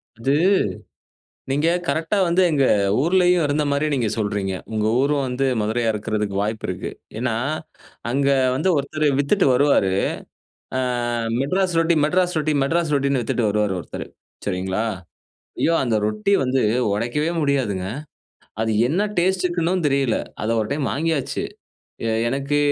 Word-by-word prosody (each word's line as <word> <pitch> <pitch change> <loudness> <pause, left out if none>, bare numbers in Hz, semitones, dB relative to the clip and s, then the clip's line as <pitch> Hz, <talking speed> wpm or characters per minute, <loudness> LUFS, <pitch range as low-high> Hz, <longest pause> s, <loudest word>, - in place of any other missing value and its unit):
அது, 115 +5 -1 1.2
நீங்க 145 +4 +2 0.2
கரெக்ட்டா 165 +7 0
வந்து 175 +2 +3
எங்க 140 -4 +2 0.4
ஊர்லயும் 180 0 +3
இருந்த 145 +1 0
மாரி 140 +2 +1
நீங்க 120 -5 0
சொல்றீங்க. 100 -2 -1 0.2
உங்க 110 -1 0
ஊரும் 140 0 +1
வந்து 130 +2 -1
மதுரையா 115 +2 0
இருக்கறதுக்கு 105 -1 -2
வாய்ப்பு 110 +1 -3
இருக்கு. 90 0 -4 0.3
ஏன்னா, 120 -1 -1 0.8
அங்க 140 +2 +1 0.3
வந்து 155 +8 0
ஒருத்தரு 150 +2 -1
வித்துட்டு 145 +8 +2
வருவாரு. 135 -8 +3 0.9
அ - - +1 0.6
"மெட்ராஸ் 185 +7 0
ரொட்டி, 165 0 +3
மெட்ராஸ் 180 +3 +1
ரொட்டி, 155 0 0
மெட்ராஸ் 165 +2 0
ரொட்டின்னு" 140 -2 +1
வித்துட்டு 115 0 0
வருவாரு 105 -1 +1
ஒருத்தரு. - - -7 0.4
சரிங்களா, 95 +2 -1 0.8
ஐயோ! 165 - +2
அந்த 115 -3 0
ரொட்டி 105 - -1
வந்து 130 +1 +1 0.3
உடைக்கவே 120 +10 -1
முடியாதுங்க. 130 -11 0 0.8
அது 110 - 0 0.2
என்ன 175 +9 +1 0.2
டேஸ்ட்டுக்குன்னும் 180 -1 +1
தெரியல. 135 -5 +1 0.3
அத 110 - -1
1 110 - -2
டைம் 145 -2 -1
வாங்கியாச்சு. 150 -3 -1 0.6
எ - - +1 0.2
எனக்கு, 140 +3 -1
140 Hz, 130 wpm, -22 LUFS, 110-160 Hz, 1.2 s, வந்து